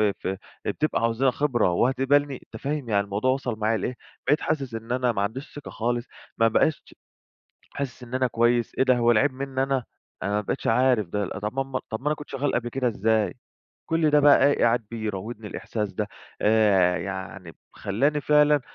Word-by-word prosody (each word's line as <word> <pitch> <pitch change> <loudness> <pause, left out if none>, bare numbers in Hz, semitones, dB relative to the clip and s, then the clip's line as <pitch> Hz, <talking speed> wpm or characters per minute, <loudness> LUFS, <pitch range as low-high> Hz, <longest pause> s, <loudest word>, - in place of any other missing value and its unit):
ف 100 -2 0 0.3
بتبقى 155 -6 -1
عاوزة 115 +2 0
لها 135 - +5
خبرة 125 -8 +1
وهتقبلني؟ 135 +6 +2
أنت 110 - -12
فاهم، 140 -2 -2
يعني 100 -2 +2
الموضوع 105 +6 0
وصل 125 -4 -2
معايا 110 +1 +1
لإيه، 115 +5 -3 0.3
بقيت 145 +3 +3
حاسس 135 -6 -2
إن 115 +2 -5
انا 125 -1 +1
ما 100 - -1
عنديش 130 +8 -4
ثقة 145 - -8
خالص، 120 +2 -2 0.3
ما 115 -1 +5
بقاش 155 +7 0 0.8
حاسس 130 -3 -5
إن 120 - -11
أنا 130 -1 +2
كويس، 120 0 +1
إيه - - +4
ده 130 -1 +4
هو 120 0 +4
العيب 130 +5 +3
مني 135 0 -2
أنا! 135 -2 0 0.4
أنا 100 - -1
ما 105 +1 +1
بقيتش - - -3
عارف 120 -4 +3
ده 100 +1 -2
طب 105 +3 -3
ما 135 - +1
ما 130 -1 -4
طب 110 - -4
ما 145 - -4
أنا 150 - +2
كنت 150 - -11
شغال 140 +1 -1
قبل 120 0 -1
كده، 130 0 -1
إزاي؟ 110 -3 +1 0.5
كل 165 -2 +2
ده 150 0 +5
بقى 145 -1 +6
إيه 145 - +1
قاعد 120 -1 +2
بيراودني 110 0 -5
الإحساس 105 -3 -4
ده، 105 +2 -2 0.3
آآ 100 -5 +4
يعني 95 -1 -6 0.2
خلّاني 140 +9 0
فعلًا 150 -1 +4
120 Hz, 195 wpm, -25 LUFS, 105-135 Hz, 0.8 s, بقى